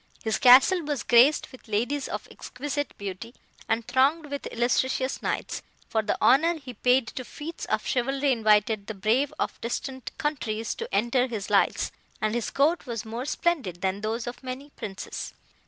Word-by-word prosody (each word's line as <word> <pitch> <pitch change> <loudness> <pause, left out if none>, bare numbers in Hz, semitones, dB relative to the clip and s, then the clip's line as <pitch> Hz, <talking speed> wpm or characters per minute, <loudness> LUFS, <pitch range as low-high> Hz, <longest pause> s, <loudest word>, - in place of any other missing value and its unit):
His 220 -1 0
castle 260 +8 +7
was 290 -4 -3
graced 250 +5 +5
with 255 - -15
ladies 245 +7 -1
of - - -5
exquisite 290 +2 -5
beauty, 200 +5 -7 0.3
and 225 0 0
thronged 285 +4 +2
with 285 - -4
illustrious 260 +2 0
knights; - - -2 0.3
for 220 - +1
the 215 - -2
honour 325 +7 +5
he 265 -5 -9
paid 250 +3 +3
to 255 - -6
feats 310 +6 -7
of - - -1
chivalry 270 +3 +1
invited 215 -2 +2
the 220 - -5
brave 225 +8 +1
of - - -3
distant 260 +2 -4
countries 225 -7 -2
to - - -7
enter 240 +5 +2
his 220 -5 -5
lists, - - +2 0.3
and 215 0 0
his 235 -1 -1
court 295 +2 +1
was 230 -2 -4
more 230 +3 -5
splendid 275 - -1
than 190 +1 -1
those 225 +3 -2
of 245 0 -7
many 260 +2 -7
princes. 205 -8 -6
245 Hz, 170 wpm, -26 LUFS, 220-275 Hz, 0.3 s, castle